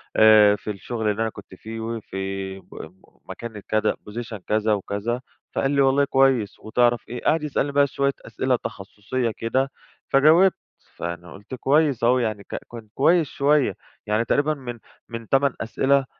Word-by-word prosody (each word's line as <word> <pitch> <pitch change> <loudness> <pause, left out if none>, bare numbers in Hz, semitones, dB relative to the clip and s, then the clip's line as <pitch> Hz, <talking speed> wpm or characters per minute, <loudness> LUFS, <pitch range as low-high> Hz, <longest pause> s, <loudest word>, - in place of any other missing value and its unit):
آآ 110 -1 +7
في 105 +1 -5
الشغل 110 +2 -3
اللي 105 +2 -3
أنا 115 - +1
كنت 100 -3 -12
فيه 110 +4 -8
وفي 95 -4 -5
م - - -19 0.6
مكاني 115 -3 -8
كذا 110 +2 0 0.2
position 115 0 -6
كذا 110 0 +2
وكذا، 105 +4 -2 0.3
فقال 135 - +1
لي 140 -1 +3
"والله 135 +1 +4
كويس 135 -6 +2
وتعرف 120 +2 +1
إيه؟" 125 - -6
قعد 155 0 +2
يسألني 145 -1 -1
بقى 140 0 +4
شوية 140 0 0
أسئلة 130 -1 0
تخصصية 115 +2 -4
كده، 130 +4 0 0.4
فجاوبت 160 +7 +6 0.4
فأنا 85 +1 -6
قلت 105 +6 -9
كويس 140 -1 +2
أهو 125 +2 +4
يعني 110 -4 -2
ك - - -7 0.2
كان 115 -2 -9
كويس 160 +3 +3
شوية، 140 -7 +2 0.3
يعني 105 +2 +1
تقريبًا 145 +5 +2
من 125 -5 -7 0.3
من 115 -1 -7
8 135 0 +3
أسئلة، 135 +4 +2
120 Hz, 160 wpm, -23 LUFS, 105-135 Hz, 0.6 s, آآ